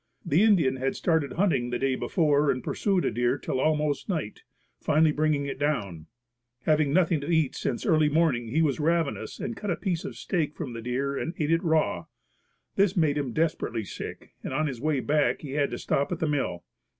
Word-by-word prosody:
The 155 +7 +3
Indian 170 -12 +4
had 135 +1 -1
started 160 -6 0
hunting 170 -10 +1
the 120 - -1
day 135 +1 0
before 150 0 +2
and 130 - 0
pursued 195 -3 0
a - - +1
deer 120 +4 +1
till 130 - -3
almost 150 +1 0
night, 155 - -3 0.4
finally 155 +1 +3
bringing 150 -1 +1
it 140 - -5
down. 100 - -2 0.6
Having 155 -1 +3
had 140 - -1
nothing 170 -4 +3
to 145 - -5
eat 160 -5 +2
since 120 - -3
early 155 -2 +4
morning 150 -7 +1
he 155 +8 +1
was 145 -3 0
ravenous 165 -1 -1
and 210 +3 -4
cut 210 - -5
a 175 - +1
piece 180 -5 -2
of - - -6
steak 155 -5 -2
from 135 -7 -5
the 115 - -6
deer 130 +4 -2
and 165 +5 -3
ate 155 -1 0
it 165 0 +2
raw. 160 -2 +1 0.7
This 200 0 +3
made 155 -4 +3
him 135 -4 -3
desperately 155 -6 -1
sick - - -8
and - - -4
on 155 - +1
his 130 -6 -4
way 150 -3 +1
back 150 +1 +1
he 145 - -7
had 145 0 +1
to - - -4
stop 140 - -1
at 180 - -1
the 160 - -1
mill. 135 -12 -1
150 Hz, 210 wpm, -27 LUFS, 135-165 Hz, 0.7 s, Indian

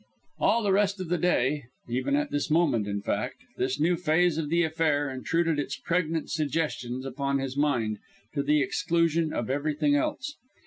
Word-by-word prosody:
All 235 - +3
the 200 - +2
rest 200 0 +2
of 185 -3 -5
the 175 -1 +1
day, 145 -5 +1 0.2
even 130 +3 0
at 145 0 0
this 145 - -1
moment, 150 -10 +2
in 100 0 -3
fact, - - -2
this 130 +2 -1
new 170 +4 +3
phase 170 0 +2
of 150 -2 -2
the 170 +2 +3
affair 155 -3 +1
intruded 165 +4 0
its 140 -1 -2
pregnant 165 -2 -1
suggestions 130 -5 -2
upon 140 +1 -1
his 135 -1 -3
mind, 120 -8 +1 0.3
to 140 - 0
the 150 +1 +3
exclusion 165 -4 +1
of 120 +2 -2
everything 145 +1 +1
else. 265 - -1
150 Hz, 175 wpm, -27 LUFS, 135-165 Hz, 0.3 s, All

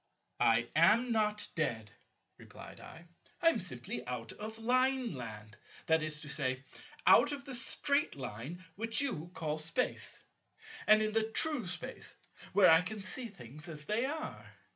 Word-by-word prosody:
"I 115 +1 +4
am 220 +10 +5
not 210 -2 +1
dead," 110 -9 -2 0.5
replied - - -11
I; 165 +1 -12 0.3
"I 330 - +6
am - - 0
simply - - -5
out - - -4
of 220 +1 -7
Lineland, 225 - -1 0.3
that 160 0 +3
is 155 -1 -3
to - - -9
say, 130 -2 -1 0.4
out - - +7
of 280 -1 -5
the 270 - -5
Straight 280 +4 +2
Line 135 - -7
which 225 +3 0
you 175 - -3
call 155 -1 -2
Space, 165 +11 -1 0.7
and 215 0 +7
in 215 - 0
the 220 0 +1
true 260 -2 +1
Space, 180 - -7 0.4
where 200 -4 +7
I 160 +1 +7
can 205 +4 -5
see 245 +4 -5
things 150 - -9
as 150 -2 -4
they 225 +7 +1
are. 310 +2 -5
195 Hz, 155 wpm, -33 LUFS, 150-235 Hz, 0.7 s, out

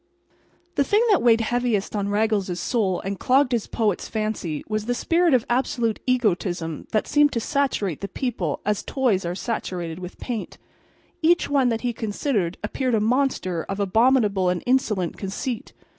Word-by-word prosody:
The 280 - +2
thing 420 - +3
that 395 - +4
weighed 230 -1 +5
heaviest 230 -3 0
on 200 -1 -1
Raggles's 205 -4 0
soul 200 -7 0
and 195 0 -4
clogged 265 +1 +3
his 235 -3 0
poet's 210 -5 -1
fancy 215 -8 -3
was 215 0 -2
the 245 - +1
spirit 335 +1 +3
of 245 - +1
absolute 240 -2 0
egotism 180 - 0
that 215 - +1
seemed 295 -1 +4
to 230 - 0
saturate 230 - -1
the 200 - -3
people 195 - -3
as 210 -1 0
toys 235 -9 0
are 175 +1 -2
saturated 180 -6 -4
with 180 0 -8
paint. 235 -5 -5 0.6
Each 335 -2 +3
one 270 -3 +3
that 225 -1 -1
he 245 -1 -1
considered 210 - -1
appeared 250 +3 0
a - - +2
monster 220 - 0
of 195 +1 -3
abominable 205 -2 +3
and 180 -1 -1
insolent 220 -9 +1
conceit. 215 +4 -4
220 Hz, 165 wpm, -24 LUFS, 195-255 Hz, 0.6 s, weighed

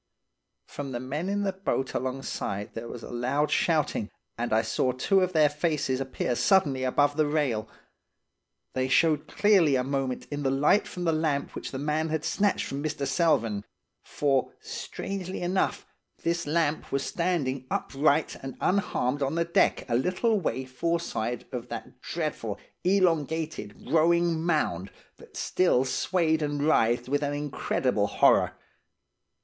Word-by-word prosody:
"From 140 -2 -6
the 120 - -2
men 145 +8 -3
in 205 0 0
the 195 -1 0
boat 185 -8 -2
alongside 130 -6 -3
there 115 +1 -6
was 120 0 -8
a - - -8
loud 130 +5 0
shouting. 155 -10 +1 0.3
and 120 0 -3
I 110 +1 +3
saw 120 +3 +1
two 190 +10 +2
of 185 0 0
their 155 -2 +5
faces 145 -3 -1
appear 130 -2 -2
suddenly 140 -6 +3
above 145 +3 +2
the 155 -1 +3
rail. 135 -8 0 1.0
They 130 0 0
showed 150 +2 +3
clearly 190 -9 +4
a 125 - +1
moment 135 -1 -2
in 145 0 -3
the 135 - +1
light 145 +10 +3
from 180 - -6
the 165 - +2
lamp 155 -3 0
which - - -5
the 130 - -5
man 150 +3 -1
had 160 0 -2
snatched 200 +5 +1
from 140 +1 -4
Mr. 150 -2 -2
Selvern; 135 - +1 0.4
for, 135 -3 0
strangely 190 -1 -5
enough, 185 +2 0 0.4
this 170 -1 0
lamp 155 -1 0
was 140 0 0
standing 140 -8 -1
upright 145 +2 +1
and 135 -1 -7
unharmed 145 -8 0
on 140 +3 0
the 170 0 +1
deck, 170 - +2
a 120 - -2
little 185 - +2
way 130 -6 -2
foreside 130 -4 -2
of 125 -1 -4
that 120 +2 -8
dreadful, 150 -11 -3 0.3
elongated, 160 - 0
growing 170 0 +3
mound, 100 - 0 0.3
that - - -14
still 155 -8 +2
swayed 160 +3 +1
and 145 -1 -1
writhed 120 -5 +3
with 145 +2 0
an 145 0 -1
incredible 130 -6 0
horror. - - +4
145 Hz, 155 wpm, -27 LUFS, 130-165 Hz, 1.0 s, their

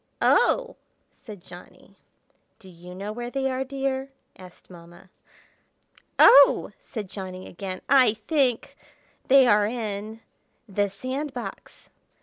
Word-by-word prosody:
"Oh!" - - +2 0.3
said 205 -6 -13
Johnny. 175 0 -15 0.6
"Do 190 - -18
you 180 +1 -13
know 200 +3 -6
where 240 +2 -6
they 265 +1 -2
are, 260 +1 -2
dear?" 270 0 -4 0.3
asked 185 -1 -16
Mamma. 175 +1 -16 1.1
"Oh!" 280 0 +6
said 215 -5 -7
Johnny 185 -1 -8
again. 185 0 -7
"I 255 -5 +4
think—they 260 +1 0
are 210 -3 +3
in—the 215 -1 -6
sand 260 +8 -6
box!" 245 - -9
220 Hz, 110 wpm, -24 LUFS, 190-265 Hz, 1.1 s, Oh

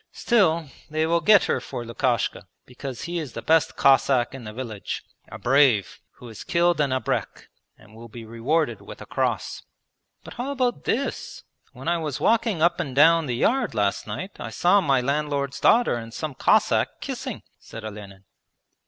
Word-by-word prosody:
Still, 170 -9 +2 0.2
they 155 +1 0
will 170 +1 +1
get 210 -1 +6
her 130 - -1
for 120 0 -6
Lukashka, 120 -1 -1 0.2
because 125 0 -8
he 170 +1 -3
is 150 -7 -6
the - - -6
best 160 0 +2
Cossack 135 -2 +3
in 130 -4 -9
the 105 - -6
village, 110 -3 -6 0.3
a - - -7
brave, 130 -6 +2
who 125 - -13
has 110 - -9
killed 175 -2 +2
an 145 - +1
abrek 130 -3 -3 0.3
and 110 -1 -19
will 115 +1 -11
be 115 0 -10
rewarded 115 +1 -1
with - - -11
a - - -9
cross.' - - -2 0.6
'But - - -10
how 250 +3 -4
about 255 -3 -1
this? 275 +4 -3 0.3
When - - -10
I 170 0 +1
was 150 -4 -4
walking 220 -7 +1
up 170 +1 +3
and 140 -7 -4
down 165 +2 +5
the 125 - -1
yard 240 - +1
last 100 -1 0
night, 120 - -5
I - - -5
saw 180 +4 +3
my 135 -6 +2
landlord's 140 0 -2
daughter 240 +1 +4
and 115 -1 -5
some 150 +5 -5
Cossack - - +2
kissing,' - - -6 0.2
said 115 - -10
Olenin. 100 -2 -9
140 Hz, 180 wpm, -24 LUFS, 120-170 Hz, 0.6 s, get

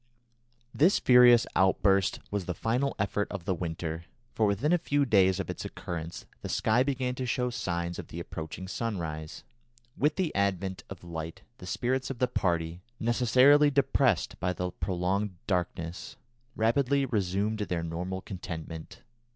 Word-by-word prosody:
This 170 +8 +4
furious 125 -2 +7
outburst 95 +1 +3
was 100 -3 -2
the 90 - -3
final 125 - 0
effort 105 +1 0
of 95 -4 -6
the 95 - +1
winter, 80 -1 -4 0.3
for 110 - +2
within 115 - +1
a 175 - +4
few 145 -3 +1
days 95 -5 +4
of 95 - -3
its - - -5
occurrence 85 -1 -6 0.2
the - - -6
sky 110 +3 +2
began 130 -2 0
to 130 0 -4
show 125 +1 0
signs 85 -5 -3
of - - -7
the 85 - -7
approaching 80 +2 -6
sunrise; 85 -8 -4 0.5
with 150 +2 +1
the 180 -5 -1
advent 95 -1 -1
of 95 -3 -9
light 80 -1 -6 0.2
the 90 - -9
spirits 130 +6 -1
of 135 - -4
the 125 - +2
party, 85 -3 -1 0.2
necessarily 130 +5 +5
depressed 130 - +1
by 90 0 0
the 90 0 -3
prolonged 95 +3 -1
darkness, 90 +6 -3 0.4
rapidly 135 +5 +2
resumed 105 -1 -1
their 90 -5 -2
normal 90 +3 -4
contentment. 80 -4 -7
100 Hz, 150 wpm, -29 LUFS, 85-125 Hz, 0.5 s, furious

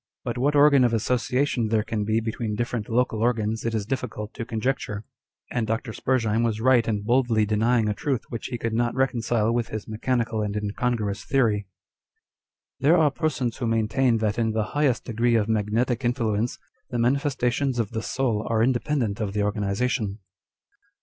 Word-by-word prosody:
But - - -3
what 140 +4 +1
organ 145 -2 +6
of 120 -2 +3
association 125 +2 0
there 110 -1 +1
can 110 -1 -2
be 110 +1 +2
between 110 -1 -3
different 120 -1 -3
local 115 -2 +1
organs 110 -2 0
it 115 -1 -1
is 105 -2 -1
difficult 110 -3 -4
to 115 - -5
conjecture; 110 -2 -2 0.5
and 120 -3 -1
Dr. 115 +1 -2
Spurzheim 115 -4 +1
was 115 -2 0
right 125 -1 +4
in 105 -2 -1
boldly 120 -2 +2
denying 110 +2 +2
a 105 - +1
truth 125 +4 -2
which 115 - -5
he 125 - -4
could 115 -1 -3
not 120 +1 0
reconcile 120 -4 +1
with 120 -1 0
his 110 -1 -6
mechanical 115 0 -1
and 105 -1 -2
incongruous 105 0 -2
theory. 110 -7 +1 0.6
" - - -68
There 160 +6 +5
are 155 -3 +4
persons 135 -6 -1
who 120 - -2
maintain 115 +2 +2
that 110 0 -1
in 110 -1 +1
the 110 -1 +1
highest 145 -5 +1
degree 120 0 +1
of 110 -2 +2
magnetic 115 +3 0
influence, 120 -2 0 0.3
the 120 - -3
manifestations 130 +1 +1
of 115 -4 -1
the 110 -1 -3
soul 115 -3 -1
are 115 -1 +2
independent 125 -3 0
of 100 -2 -2
the 105 0 0
organization." 105 +1 -1
115 Hz, 175 wpm, -25 LUFS, 110-125 Hz, 0.6 s, organ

